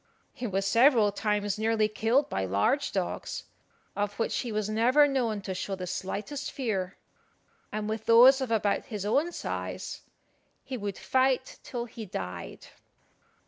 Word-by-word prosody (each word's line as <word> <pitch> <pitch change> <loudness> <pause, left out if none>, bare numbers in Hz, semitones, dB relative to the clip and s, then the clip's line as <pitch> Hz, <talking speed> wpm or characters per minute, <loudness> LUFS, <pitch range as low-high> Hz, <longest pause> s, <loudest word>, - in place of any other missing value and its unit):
He 255 -3 -4
was 195 -1 -1
several 230 -1 +5
times 205 -1 -1
nearly 220 -1 +2
killed 225 +6 +1
by 95 - -2
large 100 - +1
dogs, - - -3 0.5
of 205 0 -2
which 225 - 0
he 240 - -3
was 215 -1 -1
never 240 +7 +4
known 240 -7 0
to 190 -1 -4
show 195 +1 -3
the 185 -1 -5
slightest 205 +10 -4
fear; 195 -8 -2 0.7
and 210 0 -3
with 220 0 -4
those 255 +4 +8
of 260 - -2
about 210 -3 +1
his 210 -6 -5
own 290 +11 +2
size - - -5 0.6
he 260 - -5
would 205 -4 -4
fight 260 0 +1
till 240 -2 -5
he 225 -2 -9
died. 90 - -6
220 Hz, 150 wpm, -28 LUFS, 200-255 Hz, 0.7 s, those